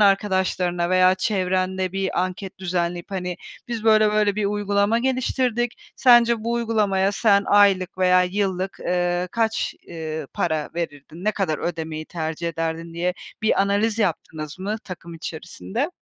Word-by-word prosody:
arkadaşlarına 190 -3 +2
veya 185 0 +5
çevrende 185 -1 0
bir 195 -1 -1
anket 185 +1 -5
düzenleyip, 175 0 -2
hani, 180 -2 -3 0.3
biz 230 -2 -4
böyle 215 -1 +5
böyle 210 -1 +2
bir 215 - 0
uygulama 205 +2 +1
geliştirdik. 250 -2 -1
Sence 235 -3 +5
bu 235 - 0
uygulamaya 210 -4 +1
sen 200 -1 +4
aylık 195 -3 +4
veya 180 0 +5
yıllık, 190 0 -2
ııı, 175 0 0
kaç, 225 -1 0 0.2
ııı, 160 -2 -5
para 160 -3 -1
verirdin, 165 +1 -6
ne 215 - +3
kadar 185 -7 -1
ödemeyi 160 -2 -4
tercih 165 0 -3
ederdin 165 0 -4
diye 180 +2 -1 0.3
bir 220 - +3
analiz 205 +3 +1
yaptınız 160 -5 -2
mı 200 +3 -2
takım 170 -2 -8
içerisinde? 185 - -4
190 Hz, 140 wpm, -23 LUFS, 175-210 Hz, 0.3 s, veya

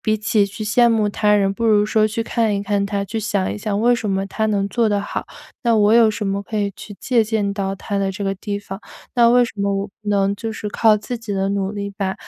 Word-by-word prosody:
比 215 -1 +1
起 215 -1 +1
去 215 +2 -7
羡 235 +3 +4
慕 220 -2 +2
他 210 0 +2
人， 195 -1 +2
不 230 +3 -2
如 210 -2 +4
说 215 0 +2
去 220 +1 -2
看 225 -2 0
一 200 - -2
看 200 -1 0
他、 200 0 -2
去 210 +3 -4
想 205 -3 -1
一 - - -6
想 205 -1 -2
为 240 +2 +4
什 225 -3 -3
么 195 0 0
他 220 +2 -1
能 200 -2 0
做 230 +2 +1
得 205 -1 +1
好， 205 - -5 0.4
那 235 -1 +3
我 210 0 +4
有 230 -1 +6
什 210 0 -4
么 195 0 -1
可 215 +2 -6
以 200 -1 -1
去 205 -2 -10
借 240 -4 +2
鉴 210 -2 -1
到 195 -1 -2
他 200 +1 -4
的 195 -1 0
这 200 +2 -6
个 195 - 0
地 200 +1 -4
方？ 200 -1 -8 0.4
那 235 -1 +6
为 245 +1 +5
什 235 - -5
么 200 0 0
我 195 +1 -2
不 210 +1 -12
能 200 -1 +2
就 225 +2 -4
是 210 - -6
靠 215 +1 +4
自 235 +3 -5
己 225 -2 -6
的 195 0 0
努 200 0 -1
力， 200 -1 -4
把 190 -1 -1
205 Hz, 295 characters per minute, -20 LUFS, 200-220 Hz, 0.4 s, 有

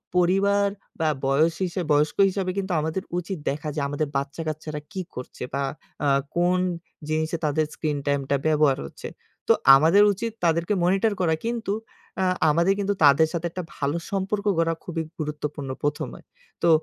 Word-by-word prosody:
পরিবার 195 +3 +3 0.3
বা 160 -1 +2 0.2
বয়স 150 +5 +3
হিসাব 175 -1 -3
বয়স্ক 150 +1 +2
হিসাবে 185 -1 -2
কিন্তু 190 -1 -2
আমাদের 160 +5 -2
উচিত 180 +1 -3
দেখা 150 +2 -3
যে - - -1
আমাদের 145 +1 -1
বাচ্চাকাচ্চারা 155 +2 -4
কি 190 -3 -3
করছে? 125 - -7
বা 140 - 0 0.4
আ - - +3 0.3
কোন 180 +1 +3 0.5
জিনিসে 160 +1 0
তাদের 155 +1 +1
screen 150 -3 -2
time 140 -1 +2
টা 140 - +3
ব্যবহার 150 -3 +3
হচ্ছে। - - -9 0.4
তো - - +9 0.2
আমাদের 165 +9 +6
উচিত 230 +4 -3
তাদেরকে 170 +3 +2
মনিটর 195 +4 +2
করা। 165 -2 +3
কিন্তু 230 -4 -1 0.5
আ - - +2 0.3
আমাদের 170 +5 +3
কিন্তু 200 0 +1
তাদের 145 +2 +6
সাথে 170 0 -2
একটা 180 +1 -5
ভালো 145 +2 -1
সম্পর্ক 200 +1 -1
গড়া 165 0 +2
খুবই 165 -2 -3 0.2
গুরুত্বপূর্ণ 150 -2 -4
প্রথমে। 145 - -2 0.4
তো 170 - +5
165 Hz, 160 wpm, -25 LUFS, 150-190 Hz, 0.5 s, তো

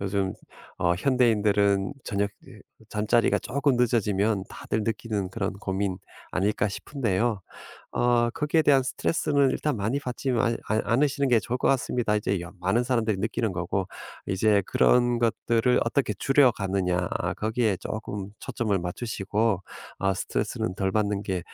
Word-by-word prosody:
요즘 100 -1 -1 0.5
어 85 0 +2
현대인들은 105 -4 +2
저녁 100 0 -1
이제 120 -6 -14 0.3
잠자리가 110 +3 +2
쪼끔 140 -1 0
늦어지면 105 -4 +1
다들 110 - -3
느끼는 110 -3 -2
그런 100 -1 -2
고민 95 -1 -2 0.3
아닐까 105 +2 +1
싶은데요. 110 -2 -1 0.5
어 120 -1 +2
거기에 150 +5 +1
대한 140 -3 +5
스트레스는 140 +1 +1
일단 150 -1 -1
많이 110 +7 -1
받지만 125 -3 -1
않 110 0 +2
않으시는 140 +3 +2
게 120 -3 +4
좋을 125 +3 -3
것 - - +1
같습니다. 120 -4 +1
이제 100 -3 -1
여 85 0 -8
많은 95 +7 +2
사람들이 115 -4 +1
느끼는 110 +1 -1
거고. 90 +2 -2 0.4
이제 100 +1 +2
그런 120 -1 +3
것들을 115 +1 +2
어떻게 115 -2 0
줄여가느냐 100 -8 +2 0.3
거기에 110 -1 0
쪼금 105 -1 -5
초점을 115 -6 -1
맞추시고 100 +2 -1 0.4
어 95 0 +2
스트레스는 90 0 -2
덜 95 -1 0
받는 105 -1 0
게 95 -2 -2
110 Hz, 335 characters per minute, -26 LUFS, 100-120 Hz, 0.5 s, 대한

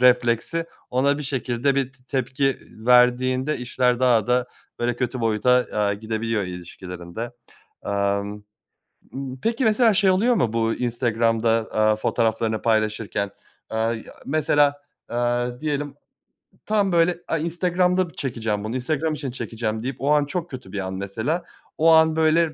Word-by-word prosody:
refleksi 125 +6 +3 0.2
ona 140 +3 +2
bir - - -4
şekilde 130 -1 0
bir 135 -1 -1
t 130 -1 -27
tepki 135 +1 0 0.3
verdiğinde 125 +3 +4
işler 125 0 +1
daha 120 -5 +4
da, 125 +1 +2 0.3
böyle, 120 0 0
kötü 125 0 -2
boyuta, 115 +1 +1 0.2
aaa, 105 -1 +1
gidebiliyor 110 +1 -2
ilişkilerinde. 90 +3 -7 0.5
Amm, 100 +1 -1 0.7
mmm, 135 -1 -6
peki 230 +3 0
mesela 220 +1 +4
şey 200 0 +3
oluyor 220 +7 +3
mu 115 - +1
bu 115 -1 +1
Instagram'da, 115 -2 0 0.2
aaa, 110 0 +3
fotoğraflarını 110 0 0
paylaşırken? 110 -2 0 0.4
Aaa, 110 +1 0
ya, 115 - -9
mesela, 145 -1 +2 0.3
aaa, 120 +1 -1
diyelim 145 -2 -2 0.7
tam, 205 -2 +2
böyle, 170 0 +3
"Ay, 165 -1 -1
Instagram'da 180 +1 +1
bir - - -18
çekeceğim 110 -6 -3
bunu, 110 +3 -4
Instagram 155 +5 -1
için 145 -4 -4
çekeceğim." 110 -3 -4
deyip 130 +1 -3
o 140 - 0
an 150 -1 +4
çok 170 +4 -4
kötü 125 -8 -9
bir 100 - -3
an 95 -1 -3
mesela. 110 - -2 0.3
O 165 +1 +4
an, 160 0 +5
böyle, 160 0 +3
125 Hz, 145 wpm, -23 LUFS, 110-150 Hz, 0.7 s, an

